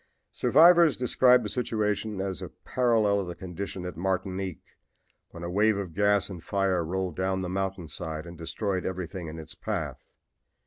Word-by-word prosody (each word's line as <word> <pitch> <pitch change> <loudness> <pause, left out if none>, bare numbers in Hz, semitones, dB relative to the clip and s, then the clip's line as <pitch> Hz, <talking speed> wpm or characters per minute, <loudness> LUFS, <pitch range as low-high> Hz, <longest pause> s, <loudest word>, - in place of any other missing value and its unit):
"Survivors 170 -2 +6
describe 125 0 +4
the - - -3
situation 105 -2 -1
as 95 -4 -3
a - - -6 0.2
parallel 115 -5 +2
of 95 - -3
the 85 - -5
condition 95 0 -6
at 90 - -5
Martinique 95 +1 -3 0.5
when 85 - -10
a 85 - -3
wave 105 +2 +3
of 95 -5 -5
gas 100 +2 +3
and 90 -5 -8
fire 95 -3 +1
rolled 90 0 -2
down 95 0 0
the 90 - -3
mountain 95 -1 -3
side 80 +1 -5
and 85 0 -9
destroyed 95 +3 -2
everything 90 -1 -4
in 80 +1 -7
its 80 -1 -9
path. - - -4
95 Hz, 170 wpm, -28 LUFS, 90-105 Hz, 0.5 s, Survivors